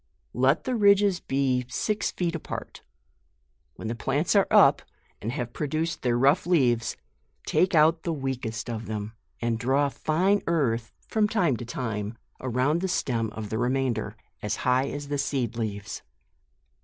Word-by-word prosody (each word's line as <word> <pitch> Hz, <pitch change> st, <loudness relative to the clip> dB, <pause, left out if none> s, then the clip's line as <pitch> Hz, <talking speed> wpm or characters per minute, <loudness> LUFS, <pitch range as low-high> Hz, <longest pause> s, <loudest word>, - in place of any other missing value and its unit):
Let 130 Hz, +5 st, +2 dB
the 255 Hz, -, -1 dB
ridges 200 Hz, -3 st, +4 dB
be 135 Hz, -2 st, 0 dB
six 215 Hz, -, -1 dB
feet 175 Hz, -2 st, -2 dB
apart. 165 Hz, -, -6 dB, 0.9 s
When -, -, -6 dB
the 115 Hz, -, -1 dB
plants 140 Hz, -, 0 dB
are 200 Hz, -, +5 dB
up -, -, +6 dB, 0.4 s
and 110 Hz, -, -3 dB
have 125 Hz, -3 st, -4 dB
produced 155 Hz, +3 st, -2 dB
their 120 Hz, -2 st, +1 dB
rough 140 Hz, +8 st, +3 dB
leaves, 125 Hz, -10 st, +2 dB, 0.5 s
take 185 Hz, -1 st, +2 dB
out 160 Hz, +1 st, +5 dB
the 170 Hz, -, -2 dB
weakest 130 Hz, -6 st, -3 dB
of 115 Hz, -1 st, -5 dB
them, 105 Hz, 0 st, -4 dB, 0.3 s
and 115 Hz, -1 st, 0 dB
draw 135 Hz, +4 st, +2 dB
fine 180 Hz, +8 st, +1 dB
earth 120 Hz, -9 st, 0 dB, 0.2 s
from 215 Hz, -1 st, +2 dB
time 180 Hz, -, +2 dB
to 120 Hz, -, -7 dB
time 115 Hz, -2 st, -4 dB, 0.2 s
around 130 Hz, +6 st, 0 dB
the 190 Hz, -, 0 dB
stem 115 Hz, -10 st, -1 dB
of 110 Hz, -2 st, -6 dB
the 110 Hz, -, -1 dB
remainder, 120 Hz, -4 st, 0 dB, 0.3 s
as 105 Hz, +1 st, -1 dB
high 125 Hz, +2 st, +3 dB
as 145 Hz, 0 st, -6 dB
the 145 Hz, -1 st, -1 dB
seed 130 Hz, -5 st, -1 dB
leaves. 105 Hz, -3 st, -4 dB
130 Hz, 155 wpm, -26 LUFS, 115-160 Hz, 0.9 s, up